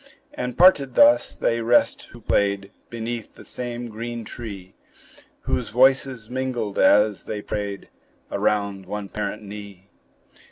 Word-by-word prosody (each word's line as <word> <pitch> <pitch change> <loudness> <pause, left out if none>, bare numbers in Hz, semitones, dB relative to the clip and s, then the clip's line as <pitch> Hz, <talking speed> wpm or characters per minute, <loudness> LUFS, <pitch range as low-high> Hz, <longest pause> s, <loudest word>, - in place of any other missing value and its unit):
And 125 -1 -4
parted 165 -7 +5
thus, 290 +1 +5
they 115 0 0
rest 120 +1 +2
who - - -14
played 100 -1 0 0.2
Beneath 115 -1 -5
the - - -14
same 120 -1 -5
green 115 +1 -6
tree; 100 -6 -8 0.7
Whose - - -2
voices 130 -1 +3
mingled 125 -5 -3
as 105 0 +4
they 105 -1 -5
prayed 100 -2 -4 0.4
Around 100 -2 -1
one 105 0 -5
parent 105 0 -4
knee. 100 -2 -10
110 Hz, 125 wpm, -23 LUFS, 100-120 Hz, 0.7 s, parted